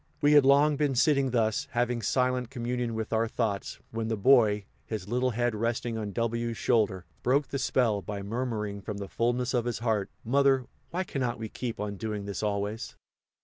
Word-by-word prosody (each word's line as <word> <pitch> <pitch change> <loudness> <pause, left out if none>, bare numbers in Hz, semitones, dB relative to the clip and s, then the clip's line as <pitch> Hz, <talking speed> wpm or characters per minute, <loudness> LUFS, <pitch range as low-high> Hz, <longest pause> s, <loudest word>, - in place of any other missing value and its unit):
We 145 0 +4
had 145 -2 +7
long 145 +2 +5
been 145 -2 +1
sitting 140 +1 +3
thus, 110 -3 +1
having 120 0 0
silent 125 +2 +1
communion 120 -2 -2
with 110 0 -3
our 115 +1 +2
thoughts, 110 -4 -2
when 115 0 -2
the 110 -1 -1
Boy, 105 -3 +4 0.2
his 105 -4 -4
little 125 +3 +1
head 120 0 0
resting 115 +1 -1
on 105 -2 -3
W 115 +2 -1
's - - -11
shoulder, 105 -7 +1 0.2
broke 140 +3 +2
the 140 - -2
spell 115 -7 +1
by 100 -1 -5
murmuring 105 -2 -3
from 105 0 -5
the 100 -1 -5
fullness 120 +4 0
of 120 -2 +1
his 120 -2 -1
heart, 110 -4 0 0.2
"Mother, 135 +1 +3 0.2
why 185 +2 -1
cannot 125 -8 -2
we 110 -1 -5
keep 120 0 -5
on 105 -1 -3
doing 105 -1 -4
this, 100 -2 -4
always?" 105 +1 -2
115 Hz, 190 wpm, -28 LUFS, 105-125 Hz, 0.2 s, had